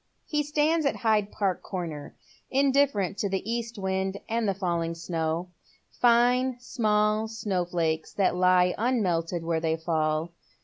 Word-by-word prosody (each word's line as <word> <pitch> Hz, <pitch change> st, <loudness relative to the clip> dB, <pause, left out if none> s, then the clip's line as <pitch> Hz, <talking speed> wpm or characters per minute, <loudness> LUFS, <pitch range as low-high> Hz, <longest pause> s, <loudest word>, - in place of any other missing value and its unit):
He 300 Hz, -1 st, 0 dB
stands 300 Hz, +1 st, +1 dB
at -, -, 0 dB
Hyde 215 Hz, -3 st, +1 dB
Park 195 Hz, -4 st, -1 dB
Corner, 165 Hz, -6 st, -6 dB, 0.3 s
indifferent 265 Hz, -8 st, +2 dB
to 200 Hz, -, 0 dB
the 190 Hz, +1 st, -3 dB
east 235 Hz, 0 st, -3 dB
wind 190 Hz, 0 st, -2 dB
and 230 Hz, -1 st, 0 dB
the 195 Hz, -, 0 dB
falling 170 Hz, -3 st, -1 dB
snow, 165 Hz, +1 st, -2 dB, 0.3 s
— -, -, -32 dB
line 245 Hz, +1 st, +4 dB
small 215 Hz, -2 st, +1 dB
snow 205 Hz, -5 st, -2 dB
flakes 165 Hz, -2 st, -1 dB
that 190 Hz, -3 st, +1 dB
lie 180 Hz, 0 st, +4 dB
unmelted 180 Hz, -8 st, 0 dB
where 165 Hz, -1 st, 0 dB
they 160 Hz, 0 st, 0 dB
fall. 160 Hz, 0 st, -1 dB
195 Hz, 145 wpm, -27 LUFS, 170-235 Hz, 0.3 s, line